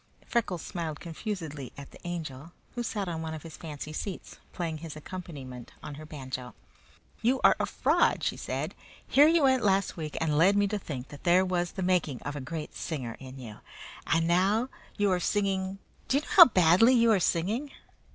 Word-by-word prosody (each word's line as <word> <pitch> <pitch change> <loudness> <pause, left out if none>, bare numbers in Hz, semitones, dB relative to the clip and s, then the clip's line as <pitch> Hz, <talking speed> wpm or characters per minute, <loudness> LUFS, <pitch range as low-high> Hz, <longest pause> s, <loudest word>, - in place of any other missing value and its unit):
Freckles 200 -8 -1
smiled 160 -4 -4
confusedly 160 - -5
at 140 -1 -10
the - - -14
Angel, 160 -2 -6 0.2
who 245 - -3
sat 210 -4 -2
on 165 -2 -3
one 160 0 -4
of 155 - -9
his 165 -2 -9
fancy 155 -1 -7
seats, 190 +4 -6
playing 165 -3 -3
his 160 -1 -7
accompaniment 145 -7 -8
on 150 - -6
her 155 +2 -9
banjo. 130 -4 -6 0.7
"You 250 +4 +2
are - - +7
a - - 0
fraud," - - +2
she - - 0
said. - - -4 0.3
"Here 290 +3 +6
you 330 -1 +4
went 260 -2 +4
last 195 -2 +2
week 155 -2 -5
and 155 -2 +1
led 190 +5 +5
me 205 0 +3
to 210 0 -1
think 135 -8 -6
that 145 - -11
there 180 +1 +5
was 175 -1 -1
the 190 - -3
making 180 -8 +1
of 145 +2 -4
a 145 - -4
great 155 +3 -6
singer 130 -8 -4
in 130 0 -10
you, 115 -5 -9 0.5
and 165 0 +2
now 195 +8 +2 0.3
you 205 -1 +2
are 180 - +2
singing 195 0 0 0.3
do 270 - +3
you - - +1
know - - -12
how 345 - +11
badly 190 - +5
you 230 -1 +5
are 205 - +4
singing?" 205 - 0
170 Hz, 200 wpm, -29 LUFS, 150-200 Hz, 0.7 s, how